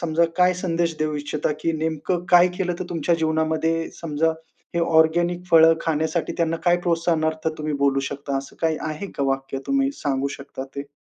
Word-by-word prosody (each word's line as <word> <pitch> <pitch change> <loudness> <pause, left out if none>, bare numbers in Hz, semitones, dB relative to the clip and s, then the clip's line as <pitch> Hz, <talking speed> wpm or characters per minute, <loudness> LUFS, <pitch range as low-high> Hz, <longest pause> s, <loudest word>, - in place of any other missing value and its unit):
समजा 170 0 +2
काय 180 0 +5
संदेश 170 -2 -1
देऊ 155 0 -1
इच्छिता 150 +1 -2
की 165 - 0
नेमकं 160 +3 -2
काय 175 0 +7
केलं 180 -2 -1
तर 185 - -3
तुमच्या 170 0 +1
जीवनामध्ये 160 0 0
समजा 160 0 0 0.4
हे 170 - +1
ऑर्गेनिक 170 +2 +2
फळं 165 0 +7
खाण्यासाठी 160 +1 -1
त्यांना 165 -1 0
काय 175 0 +4
प्रोत्साहनार्थ 160 -2 +1
तुम्ही 150 0 -2
बोलू 135 -1 +3
शकता 140 0 -3
असं 135 - -9
काही 160 -1 +1
आहे 155 +6 -5
का - - -1
वाक्य 135 0 -2
तुम्ही 275 0 +2
सांगू 140 -1 0
शकता 135 -1 -7
ते? 140 0 -9
160 Hz, 175 wpm, -23 LUFS, 150-170 Hz, 0.4 s, काय